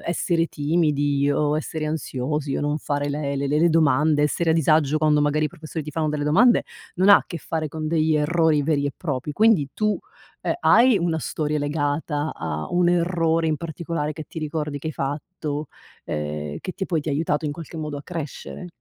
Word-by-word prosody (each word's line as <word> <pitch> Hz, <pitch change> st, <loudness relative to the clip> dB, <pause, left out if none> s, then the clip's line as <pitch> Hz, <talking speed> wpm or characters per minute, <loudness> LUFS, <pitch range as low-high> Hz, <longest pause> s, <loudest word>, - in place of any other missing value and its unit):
essere 170 Hz, 0 st, 0 dB
timidi 145 Hz, -2 st, +1 dB
o 150 Hz, +1 st, +1 dB
essere 155 Hz, 0 st, -3 dB
ansiosi 150 Hz, -1 st, -2 dB
o -, -, -2 dB
non 145 Hz, 0 st, 0 dB
fare 145 Hz, -1 st, -2 dB
le 140 Hz, -1 st, -2 dB
le 140 Hz, +1 st, -1 dB
le 150 Hz, +2 st, +2 dB
le 170 Hz, +1 st, +4 dB
domande, 150 Hz, -1 st, +3 dB
essere 160 Hz, +2 st, +1 dB
a -, -, +5 dB
disagio 155 Hz, -2 st, +3 dB
quando 150 Hz, -1 st, +3 dB
magari 150 Hz, +1 st, +2 dB
i -, -, -5 dB
professori 160 Hz, -1 st, -7 dB
ti 150 Hz, -, -6 dB
fanno 155 Hz, 0 st, -1 dB
delle 145 Hz, -1 st, -2 dB
domande, 230 Hz, +12 st, +4 dB, 0.3 s
non 190 Hz, +3 st, +3 dB
ha 200 Hz, -, +10 dB
a -, -, -2 dB
che 170 Hz, -, -6 dB
fare 155 Hz, +1 st, -3 dB
con 155 Hz, +1 st, -4 dB
degli 160 Hz, -1 st, +2 dB
errori 155 Hz, 0 st, +2 dB
veri 145 Hz, -1 st, +1 dB
e 140 Hz, -, -2 dB
propri. 145 Hz, -3 st, -3 dB
Quindi, 205 Hz, -6 st, +3 dB
tu, 215 Hz, -1 st, 0 dB, 0.4 s
uhm, -, -, 0 dB
hai 240 Hz, +1 st, +6 dB
una 170 Hz, -2 st, 0 dB
storia 150 Hz, 0 st, -2 dB
legata 145 Hz, +1 st, -1 dB
a 75 Hz, -1 st, -4 dB
un 175 Hz, 0 st, +3 dB
errore 165 Hz, -2 st, +1 dB
in 155 Hz, -, +1 dB
particolare, 165 Hz, -2 st, -4 dB
che 155 Hz, 0 st, -8 dB
ti 165 Hz, -, -7 dB
ricordi 150 Hz, -1 st, -3 dB
che 155 Hz, -, -5 dB
hai -, -, -4 dB
fatto? 145 Hz, +1 st, -4 dB, 0.4 s
Ehm, 75 Hz, -1 st, -4 dB
che 185 Hz, -, -5 dB
ti 195 Hz, -, -4 dB
poi, 165 Hz, -4 st, 0 dB
ti 155 Hz, -, -6 dB
ha -, -, 0 dB
aiutato 150 Hz, +1 st, 0 dB
in 145 Hz, -, -2 dB
qualche 165 Hz, +1 st, -9 dB
modo 150 Hz, -2 st, -4 dB
a 145 Hz, -, -7 dB
crescere? 170 Hz, +2 st, -6 dB
155 Hz, 205 wpm, -23 LUFS, 145-165 Hz, 0.4 s, ha